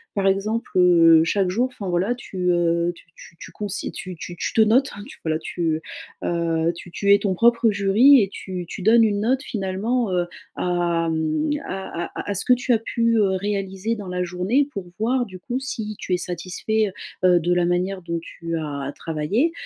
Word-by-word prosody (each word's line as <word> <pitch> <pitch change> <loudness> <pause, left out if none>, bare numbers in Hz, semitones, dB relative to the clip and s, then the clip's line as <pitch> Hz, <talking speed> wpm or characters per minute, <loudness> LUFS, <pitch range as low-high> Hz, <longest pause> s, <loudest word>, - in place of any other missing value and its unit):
Par 200 -1 0
exemple, 210 +4 0
heu, 165 -3 +6
chaque 190 +2 +1
jour, 235 +7 +1
enfin, 200 -6 -6
voilà, 180 +6 +1
tu, 185 -7 -3
heu, 170 0 +1
tu - - -18
tu 170 - -14
tu - - -10
cons 210 - -5
tu 195 - -3 0.2
tu 175 +1 -8
tu - - -3
te 225 - +4
notes, 245 +5 +4
hein, 205 - -8 0.2
voilà, 155 -1 0
tu, 160 -1 -2 0.4
heu, 165 -1 0
tu 175 0 -11
tu 200 +2 +3
es 200 - +7
ton 200 -2 0
propre 230 +3 +4
jury, 210 +7 +6
et 195 - 0
tu 185 -3 -6
tu 190 - -7
donnes 230 +2 +6
une 205 -2 +1
note, 260 +4 +1
finalement, 210 +2 -2
heu, 175 -1 0 0.3
à 175 -2 0
mmh, 160 - 0
à 190 -3 -4
à - - -11
à - - -5
à - - 0
ce 195 - -2
que 250 - +6
tu 250 0 0
as - - +4
pu, 230 0 0
heu, 200 -3 +3
réaliser 200 +2 -2
dans 205 -3 -8
la 180 0 -2
journée 190 +11 0
pour 195 -3 -6
voir, 245 +3 +1
du 185 -3 -11
coup, 245 +8 -3
si 220 -5 -5
tu 185 - -3
es 180 - +3
satisfait, 185 +4 -2 0.3
heu 185 - +6
heu - - +5
de 175 +2 +1
la 175 0 +2
manière 180 +2 -1
dont 170 0 -3
tu 165 0 -6
as 140 -3 -4
travaillé. 165 - 0
190 Hz, 210 wpm, -23 LUFS, 175-220 Hz, 0.4 s, es